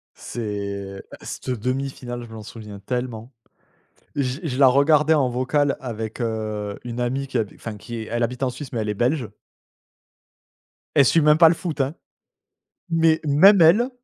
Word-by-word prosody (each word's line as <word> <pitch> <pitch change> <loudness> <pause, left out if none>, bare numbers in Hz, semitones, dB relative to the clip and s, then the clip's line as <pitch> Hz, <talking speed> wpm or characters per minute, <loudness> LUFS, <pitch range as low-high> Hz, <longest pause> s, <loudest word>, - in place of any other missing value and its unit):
C'est 100 -3 -5 0.2
c - - -10 0.2
cette - - -4
1/2 130 +4 -1
finale 120 -2 -7
je 115 - -11
m'en 110 -1 -8
souviens 105 -2 -10
tellement! 125 +2 -4 0.8
J 135 0 -2
je 130 -5 -3
la 140 - +7
regardais 150 +4 +4
en 140 -4 +2
vocal 135 +4 0
avec, 110 -3 -6
heu, 110 -3 -3
une 120 0 -5
amie 130 +3 -1
qui 130 -2 -2
a 110 - +2
enfin 110 -2 -7
qui 115 +4 -8
est 110 - -5
elle 120 +1 -1
habite 125 +3 -2
en 130 - +1
Suisse 130 +1 -9
mais 115 - -2
elle 105 - -3
est 105 - -1
Belge. 120 +3 0 1.7
Elle 140 - +6
suit 165 - +4
même 150 +1 +5
pas 165 -1 +8
le 170 - +2
foot, 160 -5 -3
hein, 135 +4 -2 0.9
mais 165 -1 +3
même 180 +7 +6
elle, 210 +11 +5
125 Hz, 180 wpm, -23 LUFS, 110-145 Hz, 1.7 s, pas